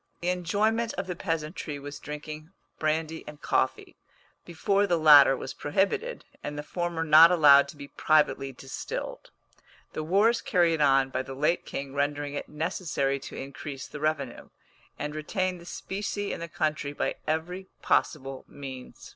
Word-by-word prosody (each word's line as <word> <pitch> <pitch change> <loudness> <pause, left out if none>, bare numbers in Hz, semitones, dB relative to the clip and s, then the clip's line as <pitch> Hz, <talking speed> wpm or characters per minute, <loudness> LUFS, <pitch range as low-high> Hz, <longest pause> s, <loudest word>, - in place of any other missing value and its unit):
The 175 - 0
enjoyment 215 +6 0
of 195 - -3
the 180 -1 -4
peasantry 160 -3 -3
was 145 0 -8
drinking 150 +1 -7 0.3
brandy 160 +1 -1
and 150 -1 -9
coffee, - - -1 0.5
before 195 +4 +1
the 175 -3 +2
latter 145 -4 +8
was 130 - -6
prohibited, 200 - -1 0.2
and 145 0 -5
the 145 - -4
former 175 0 -2
not 160 +1 +8
allowed 145 -5 +7
to 145 - -11
be 140 -1 -8
privately 150 -3 +2
distilled, 135 +1 -6 0.6
the - - -3
wars 200 +9 +3
carried 170 -4 +2
on 135 -2 +4
by 130 - -1
the 135 0 -8
late 150 +5 0
king 135 -1 -5
rendering 145 0 -1
it 145 - -5
necessary 150 -3 -1
to - - -9
increase 140 0 -7
the 150 - -8
revenue, 150 -4 -2 0.5
and 150 0 -4
retain 185 +4 -2
the 170 - -13
specie 205 +2 -4
in - - -5
the 170 - -5
country 155 -3 -2
by - - -2
every 175 +5 -2 0.2
possible 135 -3 0
means. 130 -2 -9
155 Hz, 155 wpm, -27 LUFS, 140-175 Hz, 0.6 s, latter